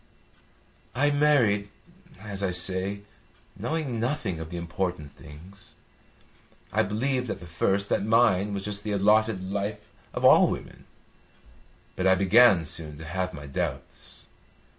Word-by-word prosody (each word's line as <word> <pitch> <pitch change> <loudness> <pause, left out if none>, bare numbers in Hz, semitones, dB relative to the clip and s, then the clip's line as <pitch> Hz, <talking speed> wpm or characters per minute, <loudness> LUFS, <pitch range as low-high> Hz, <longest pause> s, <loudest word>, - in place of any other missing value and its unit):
"I 145 +3 +2
married, 125 -9 +2 0.5
as 100 -1 -6
I 95 - 0
say, 95 +3 0 0.5
knowing 130 +1 -3
nothing 115 - -2
of 80 0 -7
the 85 - -6
important 85 -3 -4
things. 95 +9 -14 1.0
I - - +3
believed 125 +5 -1
at - - -4
the 90 - -11
first 95 +4 0
that - - +1
mine 105 -3 +3
was 100 -1 -4
just 105 -1 -3
the 105 - -2
allotted 100 -1 +2
life 105 +1 -4 0.2
of - - -2
all - - +7
women. - - -6 1.1
But 95 - 0
I 95 - +5
began 95 -1 +5
soon 75 -2 -7
to 80 - -10
have 90 +4 -3
my 75 -4 -9
doubts. 70 - -6
100 Hz, 140 wpm, -26 LUFS, 90-110 Hz, 1.1 s, all